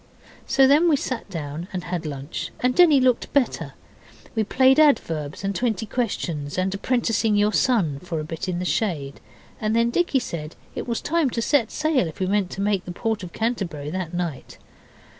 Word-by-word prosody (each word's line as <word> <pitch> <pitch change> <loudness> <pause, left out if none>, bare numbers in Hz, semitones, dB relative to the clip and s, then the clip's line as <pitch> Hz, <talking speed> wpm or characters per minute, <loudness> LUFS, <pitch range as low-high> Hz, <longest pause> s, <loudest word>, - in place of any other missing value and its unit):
So 270 - +5
then 300 +6 +5
we 305 - +5
sat 255 -5 -4
down 160 -1 -5
and 185 -2 -4
had 175 -2 -3
lunch, 140 +1 -5
and 250 0 +2
Denny 315 -2 +6
looked 255 -2 +2
better. 280 -3 0 0.6
We 220 - +1
played 260 +6 +4
adverbs, 165 - +2
and 195 0 -1
twenty 220 -1 -1
questions, 175 - -3
and 185 +1 0
apprenticing 225 0 +1
your 205 +1 +3
son, 190 - +2
for 170 -1 -4
a - - -3
bit 165 +4 -5
in 175 - -1
the 180 - -3
shade, 155 -9 -1 0.4
and 215 0 0
then 230 0 +3
Dicky 345 -1 +2
said 170 -11 -4 0.2
it - - -5
was 235 -1 -2
time 330 -3 +1
to 230 - -2
set 270 -5 +2
sail 300 - +1
if 160 - -9
we 190 - +1
meant 195 -1 +1
to 195 - -5
make 200 -2 0
the 180 - -6
port 220 +4 -2
of 180 -2 -7
Canterbury 180 -11 -3
that 185 -2 -3
night. 175 -6 -4
205 Hz, 195 wpm, -23 LUFS, 170-250 Hz, 0.6 s, Denny